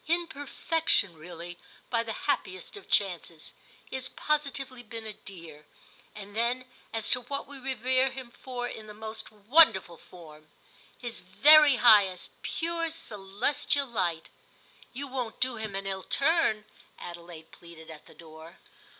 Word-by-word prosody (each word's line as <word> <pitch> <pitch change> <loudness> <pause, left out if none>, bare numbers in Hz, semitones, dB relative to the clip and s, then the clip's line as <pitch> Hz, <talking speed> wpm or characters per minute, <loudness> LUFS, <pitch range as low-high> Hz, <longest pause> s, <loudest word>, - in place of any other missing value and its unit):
"In 340 +2 +2
perfection, 290 - +1
really, 175 +2 -9 0.3
by 230 -2 +2
the 230 -1 -5
happiest 185 - -2
of 405 - -12
chances: 175 -5 -1 0.3
he - - -6
has 260 0 -3
positively 275 -4 -2
been 230 -1 -8
a 215 - -4
dear. 165 -7 -12 0.5
And 205 0 -10
then, 240 +3 0 0.3
as 225 -2 -2
to 250 - +4
what 280 +3 -4
we 280 -1 -11
revere 260 0 +1
him 260 -2 -8
for, 245 -1 -5
in 220 -2 -8
the 210 - -10
most 220 0 -6
wonderful 215 - +4
form. 155 -3 -14 0.5
His 240 -2 -6
very 300 -1 +7
highest—pure 245 - +3
celestial 280 -1 -1
light. 180 -9 -2 0.6
You 275 +3 -5
won't 255 -4 -4
do 255 -2 0
him 215 -3 -5
an 195 0 -3
ill 190 -1 -3
turn?" 275 - +2 0.3
Adelaide 170 -2 -10
pleaded 165 -2 -13
at 155 - -12
the - - -17
door. 160 +1 -13
220 Hz, 140 wpm, -29 LUFS, 180-265 Hz, 0.6 s, very